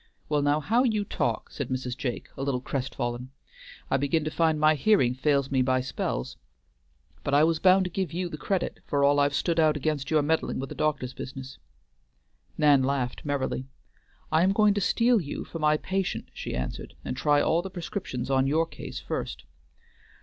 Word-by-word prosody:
"Well 150 -1 +2
now, 145 +1 +2
how 225 +11 +2
you 215 -5 +1
talk!" - - -2
said 140 -4 -4
Mrs. 130 -1 -3
Jake, 125 -3 -4
a - - -6
little 135 -2 0
crestfallen. 125 -2 -3 0.6
"I 135 - +4
begin 145 +3 +1
to 155 - -3
find 160 -2 +2
my 155 +1 +5
hearing 150 - +3
fails 140 +1 +1
me 130 -1 +3
by 130 0 +2
spells. 125 - -3 0.9
But 140 - +1
I 145 - +6
was 165 0 +2
bound 185 +1 +5
to 180 - -4
give 185 -3 -2
you 180 +2 -2
the 170 - -6
credit, 185 +4 -2
for 140 -1 +1
all 145 +1 +4
I've 145 0 +2
stood 165 +2 +1
out 155 -2 +4
against 145 -1 -2
your 155 -2 +3
meddling 160 +2 0
with 135 +1 -5
a - - -3
doctor's 140 -4 -1
business." 135 0 -8 1.0
Nan 145 -3 +5
laughed 130 -1 -1
merrily. 140 -2 -2 0.6
"I 160 +1 +4
am 190 +2 +3
going 210 0 +4
to 205 - -1
steal 235 +3 +3
you 145 - -5
for 165 - -7
my 150 0 +3
patient," 190 +3 -2
she - - -5
answered, 65 0 -5
"and - - -3
try 145 +2 +3
all 165 +3 +2
the 190 - -6
prescriptions 175 -7 -4
on 135 0 +3
your 160 +4 +2
case - - -8
first." - - -4
145 Hz, 195 wpm, -27 LUFS, 135-165 Hz, 1.0 s, I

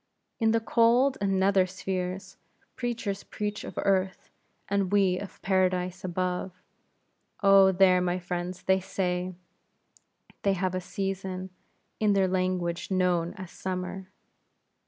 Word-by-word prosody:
In 225 -2 +3
the 225 +1 +3
cold 240 +4 +3
and 195 -1 +1
nether 190 -1 +3
spheres, 185 0 -4 0.4
preachers 230 -5 -3
preach 210 0 -4
of - - -9
earth, 190 -1 0 0.4
as 200 0 +1
we 190 -1 +2
of 200 - -9
Paradise 185 -1 +1
above. 185 0 -2 0.8
Oh, 195 -1 +7
there, 185 -1 +5
my 180 0 0
friends, 180 0 -4
they 190 0 +3
say, 180 -1 -2 1.1
they 200 - +2
have 185 -1 -1
a 185 - -2
season, 190 0 -4 0.5
in 210 -2 +3
their 195 -1 +3
language 185 -2 -1
known 180 -3 +1
as 185 -2 -9
summer. 185 0 -5
190 Hz, 125 wpm, -28 LUFS, 180-195 Hz, 1.1 s, Oh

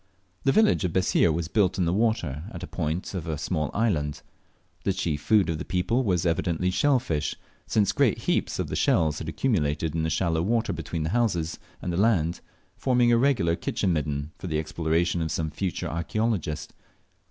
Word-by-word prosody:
The 135 - +5
village 215 - +4
of 90 -3 -1
Bessir 90 -2 +3
was 80 0 -2
built 95 -1 +2
in 90 - +2
the 85 - +1
water 90 - 0
at 85 - -7
the - - -4
point 85 +1 -3
of 90 -3 -4
a 80 -2 -2
small 75 -1 -1
island. 80 -10 0 0.6
The 95 - +1
chief 80 -6 -2
food 105 +3 +3
of 80 -2 -2
the - - -3
people 90 +9 0
was 90 -6 +1
evidently 85 +2 +1
shell 135 +9 +3
fish, 80 -12 -2 0.3
since 100 -3 +2
great 130 -1 +2
heaps - - -1
of - - -2
the - - -3
shells 80 -1 +2
had 80 - -5
accumulated 80 - 0
in 80 - 0
the 80 - 0
shallow 80 0 +1
water 115 +5 +1
between 80 -2 -4
the 80 - -1
houses 90 -7 0 0.2
and 90 - -2
the - - -1
land, 90 -6 +2 0.3
forming 125 -2 +3
a 120 - +5
regular 120 -11 +2
"kitchen 95 +1 -1
midden" 75 -1 -2
for 95 - -6
the 80 -3 -1
exploration 80 +2 0
of 80 - -1
some 80 0 -2
future 90 -1 -3
archeologist. 85 -2 -2
85 Hz, 195 wpm, -26 LUFS, 80-105 Hz, 0.6 s, The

